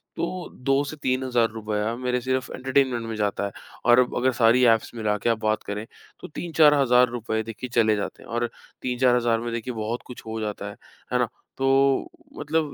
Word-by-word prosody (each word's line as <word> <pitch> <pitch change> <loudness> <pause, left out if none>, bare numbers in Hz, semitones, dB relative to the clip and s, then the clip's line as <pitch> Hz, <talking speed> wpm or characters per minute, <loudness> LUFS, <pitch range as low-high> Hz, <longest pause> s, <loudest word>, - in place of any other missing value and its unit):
तो 180 +1 -3
2 135 +2 +3
से 145 - -6
₹3000 115 -4 0
मेरे 125 0 -1
सिर्फ 130 +1 -1
एंटरटेनमेंट 130 -2 +1
में 115 - -4
जाता 105 -1 -1
है 100 - -4 0.3
और 120 +1 +7
अब 125 - +1
अगर 130 +1 +2
सारी 120 +2 +5
एप्स 115 -1 0
मिलाके 105 -1 0
आप 115 - +2
बात 110 0 +1
करें, 105 +1 -5 0.3
तो - - -8
3-4000 145 -7 +4
रुपये 115 0 -4
चले 115 -3 +3
जाते 100 - -5
हैं - - -15
और 120 0 -1 0.3
3-4000 125 -2 +2
में 115 0 -3
बहुत 115 0 -3
कुछ 125 - -11
हो 110 0 -4
जाता 105 -2 -4
है, 100 - -10 0.4
है - - +3
ना? - - +2 0.3
तो 135 0 +3 0.3
मतलब 150 0 -1
120 Hz, 175 wpm, -25 LUFS, 110-130 Hz, 0.4 s, और